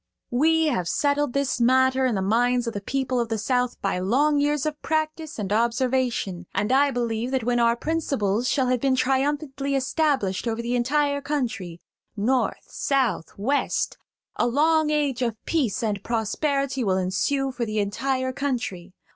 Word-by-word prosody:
We 320 +6 +3
have 185 - 0
settled 290 -2 +1
this 275 -3 0
matter 260 +2 +4
in 240 - 0
the 190 - -1
minds 245 +4 +2
of 230 - -3
the 200 - -4
people 260 +3 -1
of 235 -1 -1
the 225 - -1
South 250 +3 0
by 195 -2 0
long 285 +10 +2
years 290 0 +1
of 300 -1 -3
practice 315 0 -2
and 205 -2 -2
observation; 235 -5 0
and 210 +4 0
I 280 +2 +4
believe 235 -2 -2
that 260 -2 -1
when 240 +1 +1
our 235 0 +3
principles 250 -7 -1
shall 265 -3 +2
have 250 -1 +2
been 270 -1 +2
triumphantly 275 +1 0
established 265 - 0
over 225 0 -1
the 235 +1 -1
entire 285 +3 +1
country–North, 240 - -3
South, 265 - -1
West–a 250 +1 -2
long 310 +4 +3
age 290 -4 0
of 235 -3 0
peace 260 - 0
and 205 -3 -1
prosperity 270 +4 -1
will 190 -3 +1
ensue 265 +9 0
for 250 -2 -4
the 215 0 -3
entire 260 +6 -1
country. 235 -10 -3
255 Hz, 160 wpm, -24 LUFS, 225-280 Hz, -, matter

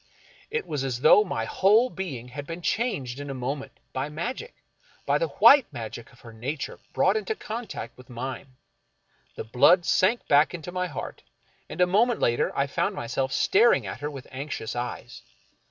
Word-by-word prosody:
It 460 0 -2
was 145 -3 -3
as 125 -2 -3
though 205 +8 +7
my 115 - -3
whole 215 - +3
being 135 -11 -6
had 140 +3 -7
been 170 +1 -7
changed 145 - -1
in 145 0 -6
a 135 - -4
moment 135 +2 -4 0.2
by 135 +2 -2
magic 245 - -5 0.3
— - - -32
by - - +2
the - - +1
white 280 - +6
magic 115 0 -7
of 120 - -21
her 115 -1 -12
nature 135 +6 -5
brought 190 +3 +2
into 215 0 -2
contact 225 +2 -6
with 125 - -15
mine. 130 +2 -6 0.8
The - - -5
blood 165 +10 +4
sank 215 +6 +2
back 150 +4 +3
to 170 +3 -8
my 180 0 -2
heart, 145 -9 -7 0.5
and - - -8
a 180 - +6
moment 220 +6 +2
later 120 0 +1
I 140 - +3
found 140 - -1
myself 130 +3 -2
staring 455 - +4
at - - -6
her 145 - -3
with 140 -3 -9
anxious 130 -4 -5
eyes. 120 0 -5
145 Hz, 185 wpm, -26 LUFS, 125-200 Hz, 0.8 s, though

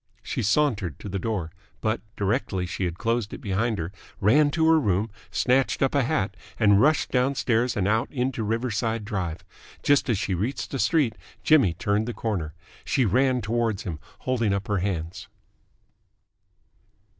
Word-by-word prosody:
She - - -3
sauntered 105 - +1
to 105 - -8
the 95 +1 -2
door, 95 -7 -2 0.3
but, 110 -1 -1
directly 100 -3 -1
she 90 +2 -3
had 85 -1 -3
closed 115 -1 -1
it - - -7
behind 105 +3 -1
her, 85 +1 -4 0.3
ran 145 +9 +4
to 160 +2 +1
her 160 0 +6
room, 105 -3 0 0.2
snatched 130 +2 +2
up 135 - +1
a 140 - +3
hat, 120 -8 0 0.2
and 105 -2 +5
rushed 155 +2 +3
downstairs 125 -2 +1
and 95 -1 +1
out 110 +2 +1
into 125 -2 -1
Riverside 115 0 -1
Drive. 90 -5 -4 0.4
Just 145 -2 +3
as 115 - +2
she 95 - -1
reached 110 +10 -2
the 135 - -3
street, 140 -10 +2 0.3
Jimmy 135 - +4
turned 105 +2 0
the 120 - -4
corner. 90 -9 -3 0.3
She 130 - +1
ran 130 +4 +2
towards 110 -1 -1
him, 85 -6 -5 0.2
holding 115 -5 0
up 100 - -4
her 105 - +2
hands. 90 -2 -3
110 Hz, 165 wpm, -25 LUFS, 100-125 Hz, 0.4 s, her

